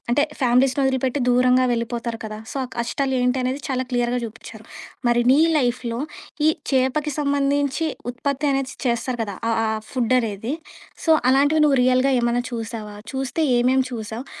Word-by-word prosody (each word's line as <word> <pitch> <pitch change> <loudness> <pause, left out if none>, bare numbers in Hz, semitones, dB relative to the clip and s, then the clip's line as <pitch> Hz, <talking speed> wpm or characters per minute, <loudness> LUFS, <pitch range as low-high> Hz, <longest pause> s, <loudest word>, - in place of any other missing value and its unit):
అంటే 290 +4 +3 0.2
ఫ్యామిలీస్‌ని 255 +2 +3
వదిలిపెట్టి 265 +1 0
దూరంగా 250 +1 +4
వెళ్ళిపోతారు 235 0 -3
కదా! 215 0 -7
సో, - - -7
ఆ - - -5
కష్టాలు 265 +3 -1
ఏంటి 250 +1 +1
అనేది 260 +3 -2
చాలా 260 -1 0
క్లియర్‌గా 245 0 0
చూపించారు. 225 +3 -11 0.4
మరి 240 0 +3
నీ 290 - +5 0.2
లైఫ్‌లో 245 -2 -1 0.5
ఈ - - +7 0.2
చేపకి 265 +3 +1
సంబంధించి, 285 +2 +1 0.2
ఉత్పత్తి 280 +3 -2
అనేది 270 -1 -1
చేస్తారు 240 +1 -1
కదా! 200 -2 -6 0.2
ఆహ్, 225 - +1
ఆ! - - 0 0.2
ఫుడ్ 255 -1 +1
అనేది. 225 +4 -3 0.5
సో, - - +3 0.2
అలాంటివి 285 +4 +4
నువ్వు 280 -3 +3
రియల్‌గా 255 +2 +3
ఏమన్నా 240 +1 +1
చూసావా? 225 -2 -5 0.2
చూస్తే 270 +4 -2 0.2
ఏమేమి 255 +2 +2
చూసావు? 225 +2 -6
255 Hz, 155 wpm, -22 LUFS, 235-270 Hz, 0.5 s, ఈ